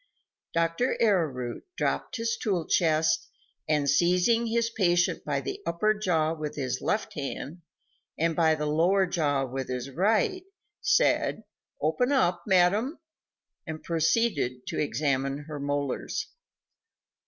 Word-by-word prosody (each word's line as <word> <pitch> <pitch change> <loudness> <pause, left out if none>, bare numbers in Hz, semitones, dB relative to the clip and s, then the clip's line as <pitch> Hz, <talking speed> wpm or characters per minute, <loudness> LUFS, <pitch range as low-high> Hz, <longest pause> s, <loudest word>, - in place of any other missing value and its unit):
Dr. 165 +9 +1
Arrowroot 155 - 0
dropped - - -1
his 230 -1 -1
toolchest 160 -4 +1 0.4
and 150 -2 +2
seizing 180 - +3
his 230 0 0
patient 175 -5 +1
by 140 -2 -1
the - - -5
upper 170 +6 +1
jaw 165 -7 +1
with 155 -2 -5
his 130 -3 -2
left 210 0 -1
hand 150 +3 -5 0.6
and 165 0 +1
by 160 -2 +3
the 150 0 -3
lower 175 +6 +3
jaw 145 -6 0
with 130 0 -5
his 125 +1 -4
right, 220 - +1 0.4
said: - - +2 0.4
"Open 250 +2 +1
up, 180 -11 +2
madam," 200 - +3 0.7
and 160 -1 -6
proceeded 160 - 0
to - - -4
examine 140 -2 0
her 150 -1 -7
molars. 140 -1 -2
165 Hz, 120 wpm, -27 LUFS, 145-200 Hz, 0.7 s, seizing